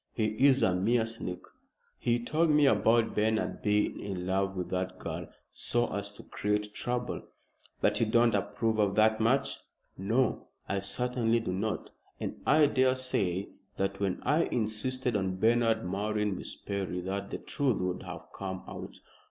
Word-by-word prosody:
"He 110 -2 +1 0.2
is 135 -1 +4
a 95 - +4
mean 110 +6 +2
sneak. 115 -5 -6 0.6
He 120 0 +1
told 155 +7 +1
me 150 -1 +5
about 115 -1 +4
Bernard 110 +1 0
being 105 0 +1
in 95 -3 -4
love 95 +1 0
with 90 - -3
that 90 0 -2
girl - - -5 0.2
so 120 0 0
as 100 0 -3
to - - -12
create 105 0 -2
trouble." 125 +2 -2 0.6
"But - - +3
you 115 - +2
don't 115 +1 +4
approve 105 +2 0
of 100 -2 +2
the 110 0 +5
match?" 130 +5 +2 0.4
"No, 115 +5 +1 0.2
I 100 - 0
certainly 120 +3 +1
do 90 -5 -3
not, 105 +3 -2 0.3
and - - -5
I 155 0 +6
daresay 130 -9 +1 0.3
that 95 0 -1
when 95 -2 0
I 155 +3 +3
insisted 120 +2 -1
on 95 -2 0
Bernard 115 0 +2
marrying 105 +1 -1
Miss - - -6
Perry 95 -2 -3
that 100 +2 -3
the - - -3
truth 135 -6 0
would 90 0 -2
have 90 -2 -8
come 95 -1 -5
out. - - -8
105 Hz, 160 wpm, -30 LUFS, 95-120 Hz, 0.6 s, I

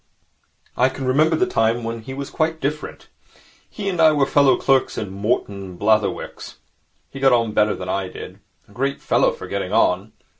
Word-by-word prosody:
I 130 +2 +3
can 130 0 -6
remember 155 +5 +3
the 175 - +2
time 115 -8 0
when 115 0 -4
he 130 +4 -8
was 140 0 -6
quite 160 0 -1
different. 150 +2 -4 0.6
He 205 -2 -6
and 180 -4 0
I 160 -1 +6
were 145 -2 +2
fellow 135 -2 +4
clerks 135 -1 +1
in 100 -3 -4
Morton 100 -1 -2
and 90 -2 -10
Blatherwick's. 105 -1 -1 0.5
He 135 - -8
got 135 -1 +4
on 115 -2 +2
better 105 0 +2
than 90 - -7
I 95 0 -2
did. - - -10 0.3
A - - -21
great 135 +6 -2
fellow - - +2
for 480 - -9
getting - - -4
on. - - +1
130 Hz, 190 wpm, -21 LUFS, 110-145 Hz, 0.6 s, I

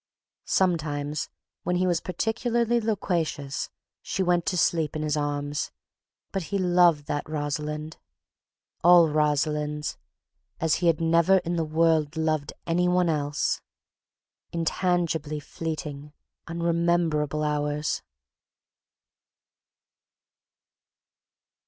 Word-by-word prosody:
Sometimes, 150 -5 0 0.3
when 180 - -1
he 180 +1 +2
was 175 -2 +1
particularly 235 +5 0
loquacious, 170 -10 -1 0.3
she 190 - -2
went 175 -1 +1
to 180 - +1
sleep 160 -2 +1
in 155 - -2
his 150 -1 0
arms, 145 0 -2 0.6
but 195 - -1
he 200 - -2
loved 175 -5 +4
that 145 +1 -3
Rosalind—all 155 +3 0
Rosalinds—as 150 +1 -2
he 175 - 0
had 165 -2 +3
never 165 +3 +4
in 175 +1 -1
the 165 - +1
world 160 -1 +2
loved 155 -2 0
any 175 +1 +2
one 180 -1 +3
else. 145 -1 0 0.9
Intangibly 165 -3 0
fleeting, 150 -1 -6 0.3
unrememberable 170 -3 +1
hours. 150 0 -1
160 Hz, 90 wpm, -26 LUFS, 150-175 Hz, 0.9 s, loved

